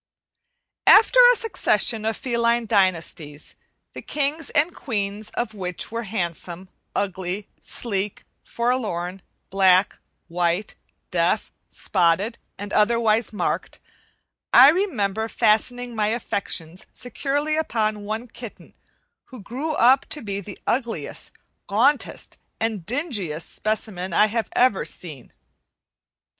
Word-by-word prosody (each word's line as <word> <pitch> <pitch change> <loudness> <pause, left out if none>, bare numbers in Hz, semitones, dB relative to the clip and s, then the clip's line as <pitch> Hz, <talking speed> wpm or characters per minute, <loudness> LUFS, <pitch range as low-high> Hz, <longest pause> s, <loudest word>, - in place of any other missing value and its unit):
After 455 +4 +7
a - - +2
succession 235 - +1
of 220 0 -1
feline 235 -1 +1
dynasties, 170 -7 0 0.4
the - - -7
kings 300 +2 -1
and 315 +3 +1
queens 210 -4 -3
of 240 -2 -2
which 180 -2 -4
were 230 0 -3
handsome, 180 -2 -4 0.3
ugly, 190 0 -2
sleek, 205 -3 -3 0.2
forlorn, 205 -7 -2 0.3
black, 190 0 +4 0.3
white, 175 +3 -1 0.4
deaf, - - +1 0.2
spotted, 190 +5 +1 0.2
and 205 0 -7
otherwise 225 0 +3
marked, 210 - -2 0.7
I 260 +3 +9
remember 225 - 0
fastening 235 +2 +1
my 210 -1 +1
affections 195 -6 -2
securely 285 +5 -1
upon 215 -9 -1
one 220 +4 -4
kitten 235 -1 -11 0.5
who 255 - -12
grew 265 +10 -4
up 260 0 +4
to 300 - -5
be 200 -2 -3
the 200 0 -9
ugliest, 235 -2 -2 0.4
gauntest, 250 +8 +1 0.2
and 220 -6 -2
dingiest 215 - -2
specimen 205 -4 -3
I 210 +4 +4 0.2
ever 245 -6 +3
have 150 - -3
seen. 150 -8 -8
215 Hz, 110 wpm, -23 LUFS, 190-245 Hz, 0.7 s, I